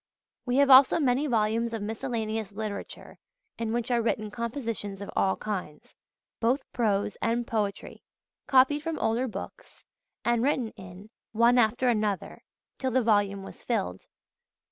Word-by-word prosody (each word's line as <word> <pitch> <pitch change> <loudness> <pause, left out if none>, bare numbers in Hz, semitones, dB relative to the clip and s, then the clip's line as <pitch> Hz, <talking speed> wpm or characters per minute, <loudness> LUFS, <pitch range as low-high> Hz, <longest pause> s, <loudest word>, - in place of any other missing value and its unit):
We 245 - +1
have 280 0 +5
also 265 +4 +8
many 275 0 +1
volumes 230 -1 +1
of 225 - -3
Miscellaneous 220 -2 -3
Literature 210 -1 -7 0.4
in 230 -1 -2
which 240 +1 -2
are 240 -1 +2
written 215 -2 -1
compositions 230 -4 -4
of 200 - -7
all 190 - +2
kinds, 185 -8 -6 0.5
both 250 +4 +1
prose 205 -3 0
and 235 +1 0
poetry, 210 -4 -3 0.5
copied 270 +3 +4
from 325 0 -3
older 235 +4 0
books, 220 - -9 0.4
and 235 -1 +2
written 255 -3 +1
in, 190 +2 -13 0.2
one 235 +2 +4
after 240 +3 +2
another, 210 -4 -1 0.4
till 260 - 0
the 255 0 +2
volume 205 -3 +2
was - - -11
filled. 195 - -3
230 Hz, 145 wpm, -27 LUFS, 210-245 Hz, 0.5 s, also